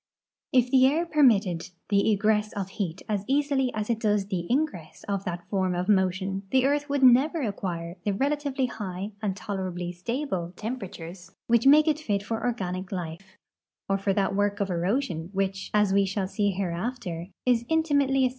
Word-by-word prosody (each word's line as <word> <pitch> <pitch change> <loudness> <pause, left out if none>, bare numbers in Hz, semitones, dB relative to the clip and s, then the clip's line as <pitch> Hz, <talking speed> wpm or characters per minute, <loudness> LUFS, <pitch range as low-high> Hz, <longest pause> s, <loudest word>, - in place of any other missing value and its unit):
If 250 -1 +3
the 260 -1 +6
air 315 +5 +1
])ermitted 200 - +3 0.2
the 200 +1 +3
egress 210 +1 +1
of 195 -2 -4
heat 190 -3 -4
as 205 -2 -1
easily 275 -2 +1
as 215 -1 -2
it 230 -2 0
does 210 -3 +1
the 185 -4 -3
ingress 250 - -2
of 200 -1 -2
that 175 -1 -5
form 190 -3 0
of 180 +1 -2
motion 190 -1 +1
the 260 +2 +3
earth 290 +1 +1
would 280 -1 0
never 270 +5 +5
acquire 180 -5 -4
the 205 - +1
relatively 280 +4 0
high 200 -4 -5
and 200 -3 -2
tolerably 185 -3 -4
stable 185 - -3
temperatures 185 -6 -7 0.2
which 235 +2 +3
make 300 +3 +7
it 305 -1 +2
fit 205 -9 -1
for 225 +2 -3
organic 185 -6 -2
life 180 +1 -6 0.5
or 195 0 +1
for 195 0 0
that 195 0 0
work 205 +1 +1
of 200 -2 -1
erosion 175 - -1
which, 195 0 -2
as 210 -2 +3
we 200 0 +4
shall 195 0 -2
see 205 +1 0
hereafter, 185 -1 -3 0.2
is 245 -2 +3
inti 320 +2 0
mately 270 -1 +3
as. - - +3
205 Hz, 180 wpm, -27 LUFS, 185-255 Hz, 0.5 s, make